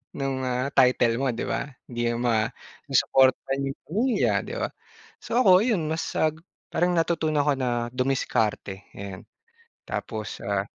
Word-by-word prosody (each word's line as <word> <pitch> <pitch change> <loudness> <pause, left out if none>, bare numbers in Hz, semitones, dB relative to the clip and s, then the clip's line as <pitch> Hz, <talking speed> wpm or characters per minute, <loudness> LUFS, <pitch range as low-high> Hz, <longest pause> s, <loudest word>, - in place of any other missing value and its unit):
nung 135 -1 -2
ah, 125 +2 0
title 125 -3 +4
mo - - +2
di - - -3
ba? - - -1 0.2
Hindi 120 -1 -3
'yan 120 - -2 0.7
masuportahan 135 +1 +3
yung - - -11
pamilya 230 - +1
'di - - -6
ba? - - 0 0.6
So 235 - -1
ako 185 -5 +7
yun, 185 -11 +1
mas, 160 +1 -1
ah, 155 - +4 0.4
parang 175 +1 +2
natutunan 160 -3 +1
ko 145 - +3
na 120 -2 -1
dumiskarte 115 -6 -1
ayan 100 -1 -8 0.6
tapos 110 -1 -4
ah, 100 -1 0
130 Hz, 145 wpm, -26 LUFS, 120-160 Hz, 0.7 s, ako